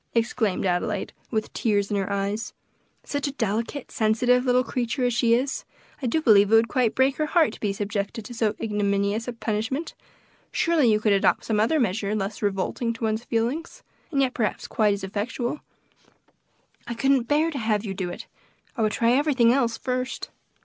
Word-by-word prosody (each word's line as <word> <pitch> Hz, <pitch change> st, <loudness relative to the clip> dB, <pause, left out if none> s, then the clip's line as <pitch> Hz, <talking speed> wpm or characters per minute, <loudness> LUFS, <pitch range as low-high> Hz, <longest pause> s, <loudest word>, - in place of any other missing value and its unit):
exclaimed 225 Hz, -4 st, 0 dB
Adelaide, 175 Hz, -1 st, -1 dB, 0.2 s
with 220 Hz, -2 st, -2 dB
tears 205 Hz, -2 st, 0 dB
in -, -, +1 dB
her 195 Hz, 0 st, -2 dB
eyes; 200 Hz, +3 st, -2 dB, 0.5 s
"such 285 Hz, 0 st, -2 dB
a -, -, -2 dB
delicate, 230 Hz, +3 st, -2 dB
sensitive 245 Hz, +3 st, +2 dB
little 250 Hz, 0 st, +3 dB
creature 250 Hz, +2 st, -1 dB
as 245 Hz, -, +1 dB
she 230 Hz, 0 st, +3 dB
is, 260 Hz, +3 st, -1 dB, 0.4 s
I 255 Hz, -, -1 dB
do 315 Hz, +7 st, 0 dB
believe 205 Hz, -4 st, +6 dB
it -, -, +7 dB
would 225 Hz, +1 st, +5 dB
quite 245 Hz, -4 st, +1 dB
break 265 Hz, +1 st, +2 dB
her 305 Hz, -, 0 dB
heart 325 Hz, -1 st, +3 dB
to -, -, -11 dB
be 205 Hz, -, 0 dB
subjected 205 Hz, +2 st, -3 dB
to 245 Hz, -, -8 dB
so 220 Hz, -2 st, 0 dB
ignominious 205 Hz, +1 st, 0 dB
a 245 Hz, -, -3 dB
punishment; 225 Hz, +7 st, -3 dB, 0.6 s
surely 315 Hz, -9 st, +3 dB
you 210 Hz, -, +3 dB
could 215 Hz, -1 st, +2 dB
adopt 195 Hz, -, +2 dB
some 215 Hz, -2 st, 0 dB
other 270 Hz, +9 st, +2 dB
measure 210 Hz, -2 st, 0 dB
less 200 Hz, 0 st, -3 dB
revolting 205 Hz, +4 st, -1 dB
to 230 Hz, -, -9 dB
one's 220 Hz, +1 st, -1 dB
feelings, 245 Hz, +9 st, -2 dB, 0.3 s
and 280 Hz, -5 st, +1 dB
yet 260 Hz, -1 st, 0 dB
perhaps 220 Hz, -4 st, -2 dB
quite 210 Hz, -2 st, +2 dB
as 200 Hz, -, -9 dB
effectual. 230 Hz, +7 st, -3 dB, 1.3 s
I 235 Hz, -, -4 dB
couldn't 265 Hz, 0 st, +2 dB
bear 310 Hz, +4 st, +2 dB
to 280 Hz, -, -4 dB
have 220 Hz, -2 st, 0 dB
you 195 Hz, -, -3 dB
do 185 Hz, -2 st, -3 dB
it. 175 Hz, -, -7 dB, 0.5 s
I 235 Hz, -, -2 dB
would 215 Hz, -1 st, +1 dB
try 230 Hz, 0 st, +2 dB
everything 255 Hz, -3 st, +4 dB
else 240 Hz, -4 st, +1 dB
first." 255 Hz, 0 st, -3 dB
230 Hz, 190 wpm, -25 LUFS, 210-255 Hz, 1.3 s, it